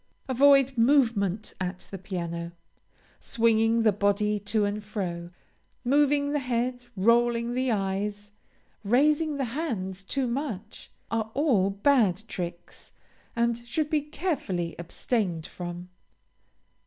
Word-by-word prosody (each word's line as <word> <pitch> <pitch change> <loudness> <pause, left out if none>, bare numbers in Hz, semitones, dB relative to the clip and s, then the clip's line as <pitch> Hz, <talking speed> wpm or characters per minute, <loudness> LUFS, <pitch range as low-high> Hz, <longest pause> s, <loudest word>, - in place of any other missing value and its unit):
Avoid 270 -1 +4
movement 225 -6 +2
at 180 0 -3
the 195 - -6
piano. 170 -2 -5 0.7
Swinging 225 0 +2
the 215 - +5
body 205 +1 +1
to 205 +1 0
and 205 +1 -3
fro, 175 -5 -4 0.6
moving 285 +2 +3
the 295 - +1
head, 245 -1 -2
rolling 235 +3 +2
the 255 +1 0
eyes, 205 0 -2 0.5
raising 295 +7 +2
the 270 - 0
hands 200 - -3
too 265 +7 -2
much, 240 -5 -5 0.2
are 220 -1 -1
all 250 -10 +3
bad 205 -2 +2
tricks, 175 -3 -7 0.4
and 235 0 +1
should 290 +6 -3
be 305 -1 +2
carefully 275 - -3
abstained 175 -1 -2
from. 175 0 -7
225 Hz, 115 wpm, -27 LUFS, 195-260 Hz, 0.7 s, the